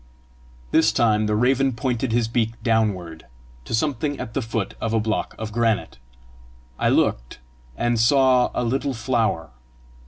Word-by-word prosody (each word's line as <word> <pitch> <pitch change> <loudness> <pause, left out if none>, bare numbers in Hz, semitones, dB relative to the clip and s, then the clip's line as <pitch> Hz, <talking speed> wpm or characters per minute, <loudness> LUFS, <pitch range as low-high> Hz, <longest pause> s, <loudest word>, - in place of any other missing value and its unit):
This 110 0 +4
time 110 -2 +2
the 105 - +1
raven 130 +3 +2
pointed 125 0 -2
his 115 0 +1
beak 115 -1 0
downward 95 - -1 0.4
to - - -1
something 145 +2 -1
at 115 -3 -6
the 135 - -1
foot 110 -3 -3
of 115 0 -1
a - - +3
block 110 0 -2
of 110 -1 -5
granite. 115 - -1 0.8
I - - +2
looked, - - 0 0.4
and 120 -1 0
saw 130 +1 +4
a 125 - 0
little 135 +3 -1
flower. 110 - -1
115 Hz, 150 wpm, -23 LUFS, 110-125 Hz, 0.8 s, This